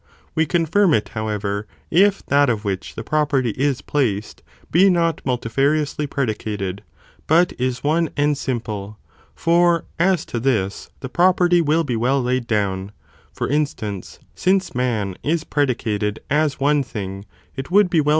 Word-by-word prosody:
We 160 -1 +1
confirm 170 +3 +3
it, 105 - -1
however, 105 -1 -3 0.2
if 195 +4 +3
that 140 -1 +3
of 110 -2 -1
which 95 -2 -3
the 115 - -5
property 140 -4 +1
is 135 +2 -1
placed, 110 -8 -1 0.3
be 190 +4 +6
not 170 -3 +1
multifariously 140 +4 0
predicated, 105 -7 -3 0.5
but 170 +3 +4
is 125 -1 -1
one 160 +2 +2
and 145 0 +2
simple, 110 -6 -4 0.4
for 170 0 +3
as 180 -1 +2
to 120 - -4
this, 110 -6 -1
the 130 - -4
property 175 +1 +4
will 160 +1 +2
be 130 -6 -2
well 125 +5 +1
laid 125 -1 -1
down, 100 -3 -1 0.4
for - - -3
instance, 120 -10 -2 0.2
since 190 +1 +1
man 110 -7 -1
is 160 +1 0
predicated 110 -9 -1
as 150 -1 +1
one 145 +1 +3
thing, 100 -5 -6 0.3
it 135 -1 -6
would 200 +2 +5
be 165 - +4
well. 150 - 0
135 Hz, 150 wpm, -21 LUFS, 110-160 Hz, 0.5 s, be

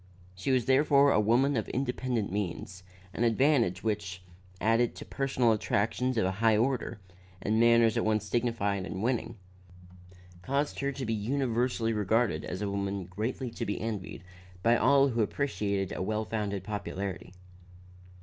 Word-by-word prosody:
She 95 +7 -4
was 130 -3 +2
therefore 140 +1 +4
a - - +3
woman 120 +7 +3
of 110 - -2
independent 125 -5 -2
means, 95 -2 -4 0.3
an 120 - -1
advantage 120 - +2
which, 100 -4 -3 0.4
added 115 +3 +2
to - - -9
personal 130 -4 +1
attractions 110 +4 0
of 110 - +2
a 95 - +1
high 110 -2 +4
order, 125 -1 -1 0.4
and 110 +3 0
manners 115 -1 +5
at 115 - +1
once 110 -1 0
dignified 110 -5 0
and 95 +3 -5
winning, 120 -1 -1 1.0
caused 140 +8 -1
her 140 0 0
to 135 -1 -5
be 115 - -1
universally 120 0 0
regarded 105 -4 +1
as 95 +3 -4
a 100 - -2
woman 100 -1 -2
greatly 115 +7 -4
to - - -5
be 105 - -2
envied 100 -6 -5 0.4
by 115 +1 +5
all 140 +3 +4
who 120 -2 0
appreciated 100 -5 -1
a - - -4
well 110 +3 -1
founded 100 -3 -3
popularity. 95 -2 -5
115 Hz, 155 wpm, -29 LUFS, 100-125 Hz, 1.0 s, manners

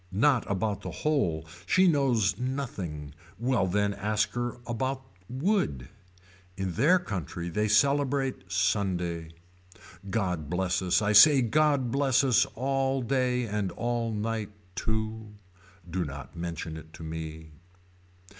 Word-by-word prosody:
Not 120 +5 +2
about 100 +1 -1
the - - -5
whole. 90 - 0 0.2
She 185 0 +5
knows 135 - +2
nothing. 100 - -4 0.2
Well 120 -4 +1
then 100 +2 +1
why 100 - -7
ask 105 +1 0
her 120 0 -3
about 130 +3 -2 0.3
wood. 130 - 0 0.7
In 95 -1 -2
their 150 - +4
country 90 - -4
they 105 +5 0
celebrate 135 -2 +1
Sunday. 90 -3 0 0.8
God 90 -9 -1
bless 90 +2 0
us 90 +2 +2
I 105 +1 +2
say 135 +5 +8
God 140 -1 +2
bless 140 -1 +3
us 130 -4 +4
all 135 +1 0
day 125 0 +1
and 105 -4 -2
all 120 -1 -1
night 110 0 -2 0.2
too. 110 0 -3 0.5
Do 90 +1 -2
not 70 0 -8
mention 85 -1 -5
it 80 +1 -12
to 80 - -10
me. 80 0 -6
110 Hz, 130 wpm, -28 LUFS, 90-130 Hz, 0.8 s, say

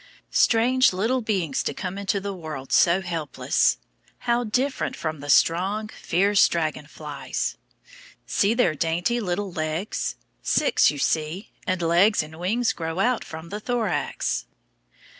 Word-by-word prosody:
Strange 245 +1 +4
little 225 +8 0
beings 190 - -1
to - - -3
come 185 -1 -4
into 200 0 -1
the 200 0 -4
world 155 -7 -7
so 175 +2 +4
helpless! 165 -5 0 0.5
How 240 0 +2
different 255 +5 -1
from 155 -2 -4
the 145 +1 -8
strong, 195 +8 +3
fierce 200 +2 +3
dragon 155 -3 -2
flies! 140 - -4 0.7
See 210 +3 +2
their 235 -10 +3
dainty 170 +10 0
little 195 -1 -2
legs. 160 +4 -2 0.3
Six, - - +3
you 150 - -3
see, 155 +7 -1 0.2
and 185 -2 0
legs 175 +4 +4
and 155 +1 -11
wings 225 +7 +1
grow 165 0 -4
out 240 +4 +1
from 160 +1 -9
the 210 - -4
thorax. 220 - -1
180 Hz, 140 wpm, -24 LUFS, 160-215 Hz, 0.7 s, Strange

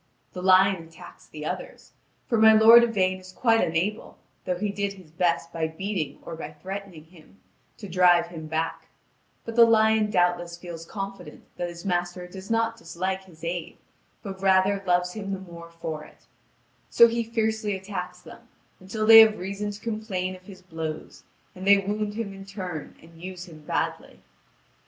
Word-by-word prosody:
The 180 - -6
lion 190 0 +5
attacks 165 0 -15
the 150 -1 -8
others; - - -6 0.4
for 230 -4 +1
my 220 0 +8
lord 225 +2 +8
Yvain 190 -5 +1
is 185 0 -13
quite 225 +3 +2
unable, 180 +7 -2 0.3
though 180 -1 -1
he 210 +2 -2
did 200 0 -2
his 185 -5 -16
best 170 0 0
by 160 -1 -1
beating 160 -3 -4
or 165 - -7
by 155 -1 -8
threatening 190 0 -8
him, 165 +3 -20 0.4
to 205 - -9
drive 175 -1 +4
him 160 -2 -8
back; 160 +1 -3 0.6
but 230 - -6
the 235 - +8
lion 220 -1 +4
doubtless 175 -2 0
feels 170 -2 -9
confident 195 -1 -7
that 175 0 -3
his 170 +1 -10
master 175 -1 -2
does 190 +2 -11
not 230 0 0
dislike 185 +1 -4
his 165 -3 -18
aid, 170 0 -4 0.5
but 190 -2 -7
rather 195 +1 +3
loves 180 0 +2
him 200 -2 -5
the 195 - -4
more 170 -2 -11
for 160 -2 -6
it: - - -18 0.6
so 235 - +7
he 235 0 -1
fiercely 220 -2 -1
attacks 190 +1 -6
them, - - -14 0.3
until 205 +4 -3
they 225 0 +11
have 220 -1 +7
reason 200 +3 -4
to 205 0 -7
complain 215 -5 -3
of 185 0 -17
his 190 -2 -12
blows, 160 -3 -7 0.3
and 185 +1 -8
they 200 0 +8
wound 205 +1 -2
him 220 -3 -4
in 195 0 -10
turn 185 -6 -7
and 165 0 -17
use 185 0 -8
him 155 -3 -13
badly. - - -3
190 Hz, 175 wpm, -25 LUFS, 170-210 Hz, 0.6 s, they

